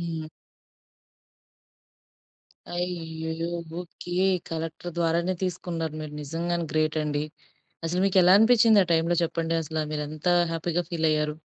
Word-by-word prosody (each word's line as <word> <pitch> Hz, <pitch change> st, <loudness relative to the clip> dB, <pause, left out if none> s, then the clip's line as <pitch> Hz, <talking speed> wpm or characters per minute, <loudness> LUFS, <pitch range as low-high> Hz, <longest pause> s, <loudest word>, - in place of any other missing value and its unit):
హ్మ్. 165 Hz, -2 st, -4 dB, 2.5 s
అయయ్యో! 165 Hz, -2 st, -3 dB, 0.3 s
Okay. 175 Hz, 0 st, -8 dB, 0.4 s
Collector 165 Hz, +2 st, -4 dB
ద్వారానే, 170 Hz, +2 st, +1 dB
తీసుకున్నారు. 170 Hz, -3 st, -3 dB
మీరు 155 Hz, -1 st, -6 dB
నిజంగానే 170 Hz, +3 st, -2 dB
గ్రేట్ 155 Hz, 0 st, +1 dB
అండి! 150 Hz, 0 st, -1 dB, 0.6 s
అసలు, 175 Hz, +2 st, 0 dB
మీకెలా 185 Hz, -2 st, +6 dB
అనిపించింది, 225 Hz, -1 st, +6 dB
ఆ -, -, -16 dB
టైమ్‌లో 165 Hz, +1 st, +2 dB
చెప్పండి? 165 Hz, 0 st, -1 dB
అసలా, 160 Hz, 0 st, -2 dB
మీరు 150 Hz, -1 st, -2 dB
ఎంత 155 Hz, +2 st, -9 dB, 0.3 s
హ్యాపీగా 165 Hz, +1 st, -1 dB
ఫీలయ్యారు? 155 Hz, -2 st, +1 dB
165 Hz, 110 wpm, -26 LUFS, 160-175 Hz, 2.5 s, మీకెలా